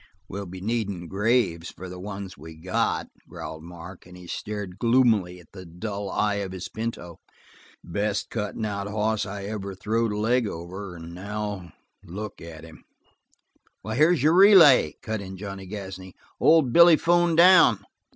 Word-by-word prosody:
"We'll 100 0 -6
be 90 +1 -9
needin' 100 -5 -3
graves 100 -4 0
for 95 - -10
the 90 0 -9
ones 100 0 -7
we 80 +3 -12
got," 90 +4 -1 0.2
growled 80 - -8
Mark, 85 +2 -11
and 90 0 -13
he 90 - -12
stared 100 0 -6
gloomily 115 -7 +2
at 85 - -19
the 95 -2 -10
dull 100 +4 -6
eye 105 -1 0
of 95 -2 -4
his 95 -1 -6
pinto. 110 -6 -6 0.6
"The 85 - -13
best 100 +2 -2
cuttin' 110 0 -3
out 100 -1 -3
hoss 110 +1 -1
I 100 +1 -6
ever 100 -1 -5
throwed 110 +4 -1
a 105 - -3
leg 115 +2 +1
over, 90 +2 -7
and 85 0 -10
now 100 -2 -6 0.3
look 100 +4 -8
at 80 -1 -10
him!" 80 -1 -14 1.0
"Here's 155 +1 +2
your 155 +2 +4
relay!" 170 - +7
cut 110 -1 -3
in 95 -1 -8
Johnny 95 -1 -7
Gasney. 95 -2 -8 0.2
"Old 155 -7 +4
Billy 170 -1 +8
'phoned 175 0 +2
down." 170 - +6
100 Hz, 160 wpm, -25 LUFS, 90-110 Hz, 1.0 s, Billy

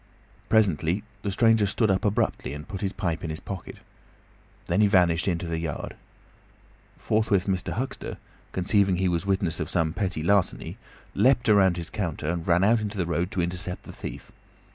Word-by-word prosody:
Presently 95 -3 +2 0.2
the 100 - -2
stranger 110 +1 +3
stood 110 +1 +1
up 95 - 0
abruptly 105 -7 0
and 75 +1 -9
put 100 -3 -6
his 95 - -1
pipe 85 -5 -3
in 85 - -3
his 80 - -4
pocket. 95 -3 -7 0.9
Then 90 +5 +1
he 105 - +6
vanished 90 -3 +3
into 85 -1 0
the 85 -1 -2
yard. 80 -3 -4 1.0
Forthwith 105 -3 +1
Mr. 95 -2 -1
Huxter, 130 +5 -4 0.3
conceiving 95 +1 +2
he 95 +1 +1
was 90 +2 -1
witness 90 -4 0
of 80 - -3
some 80 -2 0
petty 90 -4 -2
larceny, 100 +1 +1 0.4
leapt 120 +4 +3
round 95 -4 +5
his 85 -1 -6
counter 85 -8 -3
and 85 -1 -4
ran 90 +1 +4
out 110 +3 +4
into 105 -1 -4
the 90 - 0
road 85 +1 -1
to 95 -4 -1
intercept 90 +1 -2
the - - -9
thief. - - -8
95 Hz, 180 wpm, -26 LUFS, 85-105 Hz, 1.0 s, he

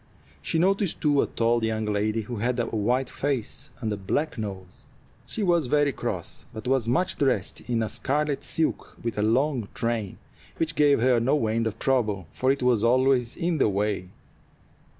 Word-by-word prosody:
She 160 - -1
noticed, 195 +1 +1
too, 145 -2 +3
a - - 0
tall 115 0 +1
young 110 -1 0
lady 105 +1 0
who 115 +2 -6
had 120 +3 -1
a 120 - +1
white 120 +4 0
face 135 -4 -3
with 110 -1 0
a - - -4
black 145 +11 -1
nose. 95 -5 -7 0.4
She 220 - -3
looked 170 -7 +2
very 145 0 +3
cross, 120 - -5
but 110 +3 -7
was 130 -3 +1
much 180 +10 +1
dressed 130 -9 0
in 115 -2 +1
a - - -1
scarlet 145 +4 -1
silk, 160 - -2
with 115 -2 -2
a - - +2
long 125 +1 +1
train, 115 -4 -2 0.4
which 160 -1 0
gave 145 -3 +4
her 125 -1 +4
no 135 +2 +2
end 115 +1 0
of 110 0 -4
trouble, 110 -9 0
for 130 +1 +2
it 135 -2 -1
was 120 -4 +3
always 125 0 +3
in 170 -2 0
the 110 - +4
way. 100 -2 -1
120 Hz, 185 wpm, -26 LUFS, 110-140 Hz, 0.4 s, gave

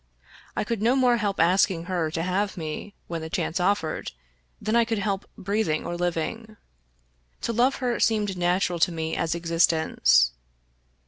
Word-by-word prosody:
I - - 0
could 220 0 -3
no 235 +4 +3
more 250 -2 +4
help 205 -3 -2
asking 175 0 +3
her 175 -3 -1
to 165 +1 -2
have 190 +3 -1
me, 160 +5 -6
when 165 -1 -5
the 160 - -6
chance 165 - -1
offered, 180 -3 -1 0.5
than 215 - -1
I 235 - +5
could 225 -1 -2
help 200 -1 -2
breathing 195 -5 -1
or 175 - -3
living. 175 +6 -3 0.8
To 235 - -2
love 250 +4 +3
her 245 -2 -1
seemed 210 -3 +1
natural 180 0 +1
to 175 - +3
me 160 -1 -3
as 165 0 -1
existence. 165 - +3
185 Hz, 165 wpm, -25 LUFS, 165-215 Hz, 0.8 s, I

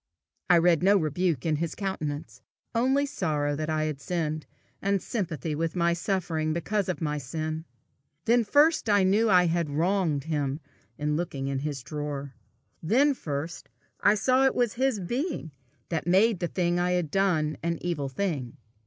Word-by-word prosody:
I 175 - +7
read 170 -1 +4
no 200 +3 +5
rebuke 160 -3 0
in 155 -2 +1
his 165 +1 -3
countenance, 155 -6 -4 0.3
only 265 +5 +2
sorrow 150 - -1
that 155 +2 -3
I 155 0 +1
had 155 -3 -3
sinned, 155 -2 -2 0.3
and 200 0 +1
sympathy 165 - -3
with 165 +3 -2
my 170 -1 +2
suffering 170 -3 -1
because 195 +4 -1
of 175 -5 -3
my 150 -1 -1
sin. 155 +4 -4 0.6
Then 235 +1 +4
first 290 +3 +3
I 205 -2 +5
knew 200 +4 +3
that 215 - +3
I 180 0 +6
had 170 -2 0
wronged 165 -1 +1
him 145 -2 -2 0.4
in 150 0 -1
looking 150 -5 -3
into 135 +1 -2
his 140 -4 -3
drawer; 145 -2 -5 0.5
then 265 - +3
first 155 - -5 0.3
I 205 - +4
saw 255 +5 +3
it - - 0
was 240 -4 +1
his 260 -3 +1
being 240 - -3 0.4
that 165 -1 -2
made 195 +3 +4
the 175 - -1
thing 175 0 0
I 180 0 +1
had 175 -4 -1
done 165 -6 +1
an 170 0 -1
evil 155 -6 -2
thing. 140 -4 -3
170 Hz, 170 wpm, -27 LUFS, 150-195 Hz, 0.6 s, I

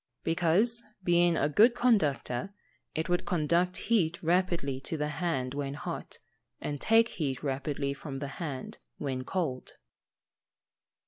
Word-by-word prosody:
_ - - -51
Because, 180 +9 +2 0.2
being 175 -1 +4
a 145 - +2
good 220 - +5
conductor, 195 - +1 0.4
it 160 0 -1
would 175 0 +1
conduct 175 +1 +1
heat 175 -8 +1
rapidly 170 -6 +1
to 160 - -3
the 150 0 -1
hand 150 -6 -1
when 140 -1 -3
hot, 170 +3 -6 0.4
and 145 -2 -4
take 225 +1 +5
heat 140 -5 -3
rapidly 140 0 -1
from 140 -1 -7
the 140 +1 -4
hand 140 -6 -5 0.2
when 130 -3 -3
cold. 140 -5 -3
160 Hz, 135 wpm, -30 LUFS, 140-180 Hz, 0.4 s, good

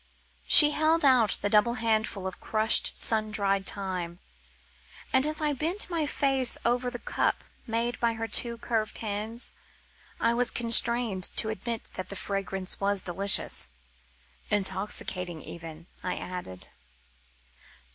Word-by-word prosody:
She 295 -1 +11
held 315 +1 +1
out 250 -6 +3
the 205 - +1
double 220 +3 +3
handful 220 -4 -2
of 190 - -6
crushed 220 0 +3
sun 215 -1 0
dried 195 -2 0
thyme, 180 -3 -5 1.0
and 265 +2 +4
as 310 +1 -1
I 300 -1 0
bent 340 +7 0
my 320 -3 -1
face 270 -4 +1
over 245 +1 0
the 245 - -6
cup - - -2 0.2
made 235 +1 -2
by 235 -1 0
her 225 0 -5
two 235 +2 0
curved 225 -2 -3
hands, 220 +2 -4 0.7
I 230 0 +1
was 245 0 +1
constrained 235 -4 +2
to 220 - +1
admit 225 +1 -6
that 185 -1 -7
the 200 - -6
fragrance 195 -1 -3
was 200 -1 +1
delicious. 195 - 0 0.8
"Intoxicating 190 -4 -3
even," 165 -1 -10 0.2
I 180 - -3
added. 175 - -7
220 Hz, 135 wpm, -27 LUFS, 195-240 Hz, 1.0 s, She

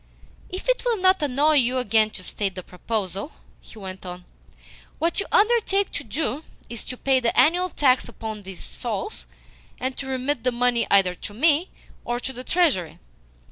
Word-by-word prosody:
"If 370 +5 -6
it - - +2
will 480 -2 +1
not 375 -1 +3
annoy 295 +2 +3
you 255 -1 +3
again 225 -4 +3
to 190 -3 -6
state 195 +1 -2
the 185 - -6
proposal," 195 - -4 0.3
he - - -15
went 190 -2 -8
on, 180 -1 -8 0.7
"what 335 +4 +1
you 400 - -2
undertake 415 -2 +3
to - - -4
do 295 -1 -3 0.3
is 235 -2 -7
to 255 - -6
pay 265 0 +3
the 235 -2 +1
annual 355 +4 +4
tax 265 -5 +2
upon 220 -2 -6
these 190 -2 -9
souls, 235 - -5 0.5
and 260 0 -2
to 270 - -5
remit 260 -1 -1
the 250 - +2
money 240 -1 +1
either 195 -2 +5
to 205 +3 -7
me 310 - +3 0.3
or 240 0 -2
to 265 +2 -4
the 250 +1 -6
Treasury?" 280 - +1
255 Hz, 180 wpm, -24 LUFS, 215-315 Hz, 0.7 s, either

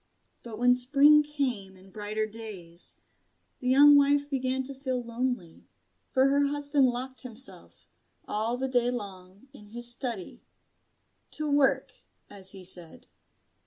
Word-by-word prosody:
But 230 -3 -9
when 245 +2 +4
spring 285 +4 +5
came 255 -10 -3
and 190 0 -19
brighter 215 +1 -3
days, 205 -6 -4 0.6
the 250 - -2
young 290 +3 +7
wife 285 0 +3
began 265 -2 -2
to 275 +2 -8
feel 260 -2 -3
lonely; 235 -7 -4 0.4
for 265 0 +3
her 285 +1 +2
husband 285 -1 +1
locked 255 +2 -4
himself, 255 0 -4 0.4
all 220 +3 -2
the 265 +1 -2
day 245 -2 +1
long, 200 -2 -8
in 210 -7 -14
his 240 +3 +3
study 240 -7 -4 0.9
to 305 0 -2
work, 275 -2 +2 0.4
as 195 -2 -7
he 190 -1 -10
said. 175 -2 0
245 Hz, 135 wpm, -28 LUFS, 210-275 Hz, 0.9 s, young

